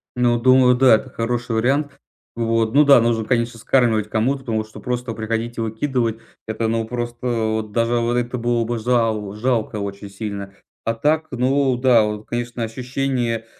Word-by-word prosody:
Ну, 120 -1 +2
думаю, 130 0 +5
да, 130 -2 +6
это 110 - -4
хороший 120 0 -2
вариант. 135 +5 0 0.4
Вот. 115 -1 0
Ну 145 +2 +6
да, 140 -3 +7
нужно, 115 -1 +1
конечно, 115 0 -1
скармливать 110 -4 +2
кому-то, 120 +6 0
потому 115 -4 -2
что 110 0 -13
просто 125 -1 -3
приходить 115 +2 -3
и - - -2
выкидывать 115 0 -1 0.3
это, 110 +1 -2
ну, 115 0 0
просто 120 +1 -5
вот 110 -2 -1
даже 115 +2 +1
вот 120 0 0
это 120 +1 -1
было 120 0 0
бы 120 +1 -3
жал 110 -4 0
жалко 110 -1 -1
очень 100 0 -6
сильно. 100 -1 -6 0.3
А 115 - +1
так, 155 +7 0
ну 130 +1 +1
да, 125 -3 +4
вот, 105 0 -4
конечно, 120 0 -3
ощущение 125 -1 -2
115 Hz, 170 wpm, -21 LUFS, 110-125 Hz, 0.4 s, да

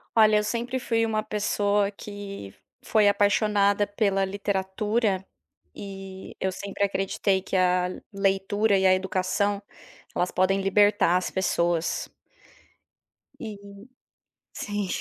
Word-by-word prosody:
Olha 215 -1 +6
eu 210 - +1
sempre 240 +4 -2
fui 230 -2 +1
uma 215 -1 0
pessoa 205 -1 0
que 200 - -8 0.3
foi 215 -2 +3
apaixonada 205 0 +3
pela 200 -2 +1
literatura, 200 +1 -1 0.6
e, 195 -1 -9
eu 190 - 0
sempre 200 +1 -4
acreditei 195 0 0
que 195 - -5
a 180 -1 +3 0.2
leitura 195 +1 +1
e 190 - +1
a 185 - +6
educação, 190 +2 -1 0.5
elas 180 - 0
podem 190 +1 +2
libertar 195 -2 +4
as 185 - -2
pessoas. 170 -3 0 1.3
E - - -5 1.1
sim. 205 -1 -3
200 Hz, 110 wpm, -26 LUFS, 190-210 Hz, 1.3 s, Olha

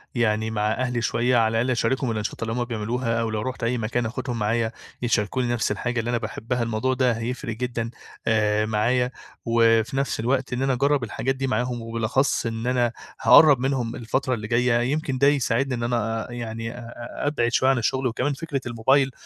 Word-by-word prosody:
يعني 110 -2 +1
مع 105 0 0
أهلي 125 0 -1
شوية، 120 +2 +2
على 115 -1 +4
الأقل 115 +3 +1
أشاركهم 120 +1 0
الأنشطة 110 -1 -4
اللي 115 - -2
هم 120 +1 0
بيعملوها 115 0 -2
أو 115 - -1
لو 110 -1 -2
رُحت 130 +1 -4
أي 120 +2 +1
مكان 120 +1 -1
آخدهم 120 +1 -3
معايا، 110 +1 0 0.3
يشاركوني 120 +1 0
نفس 110 -3 0
الحاجة 120 +3 -1
اللي 115 +1 -2
أنا 120 - +1
باحبها، 120 +2 -3
الموضوع 115 +3 0
ده 130 -1 +2
هيفرِق 115 0 -4
جدًا، 120 -2 -2 0.4
آآ، 105 -1 +2
معايا 120 +4 +1 0.3
وفي 115 +2 +3
نفس 135 -5 -1
الوقت 130 +2 0
إن 125 - -1
أنا 135 -1 +2
أجرّب 140 +1 +2
الحاجات 130 +4 -2
دي 135 0 -2
معاهم 125 -2 -1
وبالأخص 115 +3 0
إن 115 +1 -3
أنا 120 -2 +2 0.3
هاقرَّب 145 -5 +7
منهم 125 -3 -1
الفترة 130 +3 -1
اللي 105 -2 -4
جاية، 120 0 +2
يمكن 150 -3 -1
ده 140 - +4
يساعدني 135 -2 +1
إن 120 - -4
أنا 115 -2 -1
يعني 115 -1 -5
آآ، - - -10 0.5
أ - - +1
أبعد 120 -5 +1
شوية 130 +2 +3
عن 135 - +3
الشغل 130 +2 0
وكمان 130 +5 -1
فكرة 140 -2 -4
الموبايل 130 +4 +2
120 Hz, 195 wpm, -24 LUFS, 115-130 Hz, 0.5 s, هاقرَّب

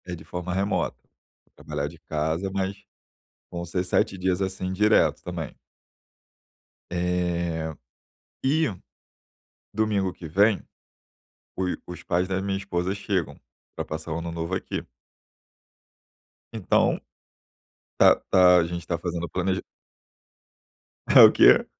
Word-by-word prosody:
É 90 -1 -5
de 80 - -12
forma 90 +3 -5
remota. 100 +2 -1 0.6
Trabalhar 70 - -4
de 80 +2 -12
casa, 80 +4 -2
mas 95 0 -2 0.8
vão 85 0 -5
ser 90 +1 -2
7 95 +1 +1
dias, 95 +1 0
assim, 95 -1 -3
direto 105 +3 +3
também. - - -6 1.3
Eh, 85 -2 -1 0.7
e, 155 +3 +3 1.1
domingo 105 -4 +1
que 85 - -9
vem, 100 +6 +3 0.9
o 95 - -1 0.2
os 90 -1 -8
pais 90 0 0
da 95 0 -1
minha 100 0 -1
esposa 95 -1 -2
chegam 100 -4 -2 0.4
pra - - -4
passar 80 +1 -5
o 85 - -2
ano 85 0 -5
novo 85 +2 -4
aqui. - - -4 1.7
Então, 110 -5 +2 1.0
tá - - +7
tá 90 -1 +7
a 85 - +2
gente 85 0 -5
tá 85 - -1
fazendo 85 -1 -3
o - - -9
planeja 95 0 -1 1.5
É - - +7
o - - +10
quê? - - +6
90 Hz, 125 wpm, -25 LUFS, 85-95 Hz, 1.7 s, o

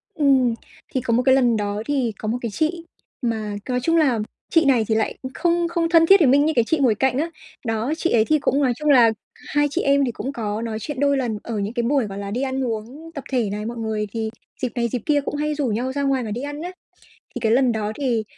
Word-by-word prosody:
Ừm, 270 -5 +3 0.4
thì 260 - 0
có 235 -2 -1
một 245 +2 +2
cái 265 -1 +6
lần 245 -4 +3
đó 205 0 -2
thì 270 -5 0
có 215 - -6
một 230 +3 0
cái 235 - -2
chị 315 - -1 0.4
mà 220 -4 -2
nói 250 0 +1
chung 330 +3 +3
là 270 -8 +3 0.3
chị 330 -2 +4
này 255 -5 +4
thì 220 - +1
lại 220 -1 0 0.2
không 345 +1 +1
không 335 -1 0
thân 330 -1 +6
thiết 390 +4 +7
với 310 - +5
mình 280 +3 +5
như 315 - +1
cái 235 - +4
chị 320 - +2
ngồi 250 -6 +3
cạnh 265 +3 +1
á, 320 +4 0 0.4
đó, 225 +5 -1
chị 340 - 0
ấy 220 -2 +4
thì 310 +3 +2
cũng 280 0 +1
nói 255 -2 +2
chung 300 +4 -1
là 245 -5 +6 0.2
2 290 0 0
chị - - 0
em 280 0 +3
thì 245 - -1
cũng 265 +4 -5
có 215 -3 -3
nói 225 -2 -3
chuyện 290 +4 -5
đôi 280 0 +3
lần 240 -5 -1
ở 225 -3 -3
những 200 +2 -3
cái 240 -1 -1
buổi, 265 0 +2
gọi 195 -1 -7
là, 200 0 -5
đi 240 +5 -2
ăn 265 0 -1
uống 245 +8 -6
tập 280 - -5
thể 240 -6 +1
này, 210 +1 -4
mọi 235 +1 -5
người 220 -2 -2
thì 225 0 -2 0.3
dịp 255 - 0
này, 235 -1 +1
dịp 240 +1 -3
kia 290 -1 +2
cũng 280 - -4
hay 300 +1 -1
rủ 290 -3 -1
nhau 245 +4 -1
ra 280 0 -1
ngoài 270 -2 +1
và 220 - -5
đi 235 +4 -3
ăn 290 +1 -5
á. 355 +2 -5 0.6
Thì - - -3
cái 220 - +2
lần 250 0 +4
đó 215 -1 -2
thì 240 -5 +1
255 Hz, 275 wpm, -22 LUFS, 225-285 Hz, 0.6 s, thiết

